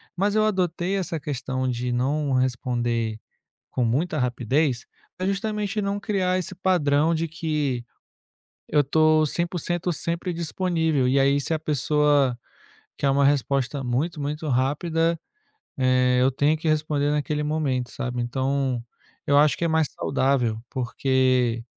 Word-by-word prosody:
mas 200 +3 0
eu 215 0 +3
adotei 185 -2 0
essa 175 -4 -2
questão 130 -2 -3
de 125 0 -2
não 135 +3 0
responder 120 -3 -1 0.5
com 125 - 0
muita 150 +8 0
rapidez, 125 +1 0 0.3
pra 185 - -2
justamente 210 +1 -1
não 200 +1 -2
criar 185 -3 0
esse 185 +1 -5
padrão 165 -4 +2
de 165 +1 -1
que 150 -6 -2 0.9
eu 150 - +4
estou 155 +2 +3
100% 175 +2 -2
sempre 170 +3 -3
disponível. 160 -5 0
E 135 +2 +3
aí 140 +1 +3
se 160 - -1
a - - -1
pessoa 145 -3 +2 0.6
quer 140 - +1
uma 140 +1 +3
resposta 140 -1 +1
muito 140 +7 -1
muito 150 +2 -3
rápida, 160 +5 +1 0.6
eh, 130 -1 +3
eu 130 +1 +3
tenho 145 +4 +2
que 160 - -4
responder 150 -2 +1
naquele 150 0 -1
momento, 145 -5 -1
sabe? 125 -3 -3
Então 130 +1 -1 0.5
eu 140 - +4
acho 150 0 +4
que 170 - -1
é - - +3
mais 160 -2 +2
saudável, 130 -5 0
porque 130 -2 +1
145 Hz, 140 wpm, -24 LUFS, 130-165 Hz, 0.9 s, eu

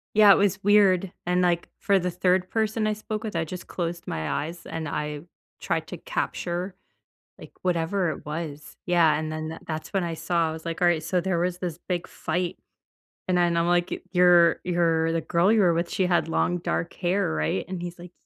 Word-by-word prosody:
Yeah, 210 -2 +8
it - - +9
was 200 -1 +1
weird, 195 -3 +4 0.2
and, 180 0 +2
like, 175 -1 +1
for 200 -1 +3
the 180 0 -1
3rd 180 +1 +1
person 220 0 0
I 215 - +1
spoke 215 +1 -5
with, 210 - -4
I 165 -1 0
just 180 +3 -8
closed 170 -1 -4
my 80 -1 -3
eyes, 170 +2 -8
and 160 -2 -5
I 150 0 -3 0.4
tried - - -2
to - - -6
capture, 185 - -3 0.6
like, - - -12
whatever 175 0 0
it 155 - -6
was. 150 -1 -6
Yeah, 170 -3 +4
and 155 0 -3
then 155 0 -4
tha 160 - -7
that's 155 +4 -5
when 190 -2 +1
I 165 -1 -3
saw, 170 -1 0
I - - -3
was 160 +1 -8
like, 165 +1 -4
"Alright, 170 -3 +3
so, 180 +1 0
there 185 -2 0
was 180 +1 -1
this 175 -4 -4
big 180 -2 -2
fight," 175 +2 -3 0.7
and 180 -1 +2
then 170 -1 +2
I'm 170 +1 +2
like, 175 0 0
"You're 175 -2 +5
you're 165 -2 +1
the 165 - 0
girl 170 +4 +2
you 220 -1 +4
were 180 -3 +4
with, 170 +1 -1
she 190 - 0
had 170 -3 +1
long 175 +2 +1
dark 170 0 -2
hair, 180 - 0
right?" 80 +5 -1
and 185 -1 -5
he's 175 0 -6
like, 175 0 -11
175 Hz, 215 wpm, -25 LUFS, 165-185 Hz, 0.7 s, it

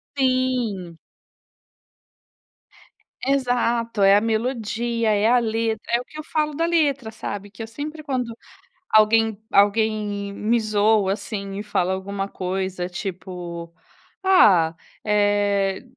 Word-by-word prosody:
Sim. 255 -10 0 2.3
Exato, 240 -5 +1
é 195 +1 +7
a 205 - +4
melodia, 230 0 -1
é 210 +1 +3
a 245 +1 +5
letra, 225 -1 -1
é 235 +1 +2
o 250 - -8
que 305 - -11
eu 310 - -5
falo 305 -1 -1
da 330 +3 +1
letra, 285 -8 +1
sabe. 205 -2 -6
Que 195 +3 -8
eu 225 - -7
sempre 300 +6 -7
quando 250 -5 -3 0.5
alguém 220 0 +4
alguém 205 -1 +2
me 230 +4 +1
zoa, 215 -2 +2
assim, 200 -2 -6
e 205 - -4
fala 190 -3 0
alguma 195 +1 -4
coisa, 185 -1 -3
tipo, 175 -2 -6 0.5
"Ah, 185 - +5 0.3
eh" 205 -1 +1
215 Hz, 120 wpm, -23 LUFS, 200-240 Hz, 2.3 s, é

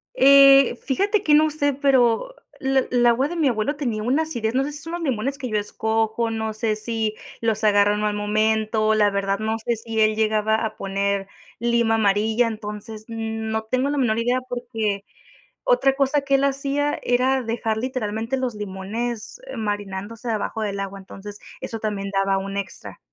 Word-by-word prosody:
Eh, 275 -1 +7
fíjate 400 - 0
que 300 - +3
no 310 +1 +5
sé, 285 -2 0
pero 270 - +2 0.2
l 265 -1 +1
el 245 -1 +3
agua 240 +4 +4
de 345 - -5
mi 305 -4 +2
abuelo 245 +5 0
tenía 235 -7 -2
una 270 +8 +2
acidez, 235 -8 -2
no 265 +1 +2
sé 290 - -5
si 295 - -5
son 330 +3 -6
los 345 - -3
limones 270 -2 -1
que 255 -4 -5
yo 215 - 0
escojo. 220 +2 -1
No 220 -1 -2
sé 215 0 -1
si, 220 0 -2 0.2
los 225 -1 0
agarro 205 -1 +4
en 210 - -2
mal 210 0 0
momento, 215 +1 +1
la 210 -1 +4
verdad 195 0 -1
no 220 +1 -1
sé 235 +2 -1
si 225 0 -2
él 215 0 +3
llegaba 220 0 +2
a 215 - -4
poner 195 0 -1 0.3
lima 235 -1 +2
amarilla, 220 +3 +2
entonces, 215 0 -6
no 220 -1 -3
tengo 255 +5 0
la 290 - -1
menor 230 -4 +1
idea 245 +2 +1
porque 225 -5 -3 0.6
otra - - +3
cosa 280 +1 +2
que 275 0 0
él 275 - +1
hacía 280 +1 0
era 255 +2 +2
dejar 225 -1 -2
literalmente 230 0 -2
los 255 -3 -2
limones 210 - -5 0.2
marinándose 205 +2 -4
abajo 220 0 -2
del 200 -1 -2
agua, 195 0 -5
entonces 205 +2 -10 0.2
eso 225 - -5
también 200 -2 -3
daba 195 0 +1
un 195 +1 -5
extra. 200 -1 -6
225 Hz, 180 wpm, -23 LUFS, 210-260 Hz, 0.6 s, Eh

